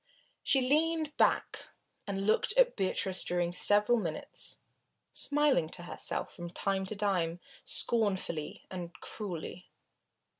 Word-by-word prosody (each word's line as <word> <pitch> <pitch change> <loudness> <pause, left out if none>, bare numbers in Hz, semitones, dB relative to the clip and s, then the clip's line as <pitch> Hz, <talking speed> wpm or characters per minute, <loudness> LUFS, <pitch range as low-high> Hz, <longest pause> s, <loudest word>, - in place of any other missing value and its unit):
She 270 - +3
leaned 310 +1 +1
back - - +1 0.4
and 195 -1 -2
looked 220 - +3
at - - +5
Beatrice 190 0 0
during 175 -1 -1
several 210 +5 +4
minutes, 165 -6 -3 0.6
smiling 290 - +1
to 175 - -9
herself 175 - -4
from 175 0 -7
time 190 +2 -2
to 215 - -4
time, 180 -5 0 0.3
scornfully 190 -9 +2
and 175 -2 -6
cruelly. 180 -3 -6
195 Hz, 115 wpm, -31 LUFS, 175-240 Hz, 0.6 s, at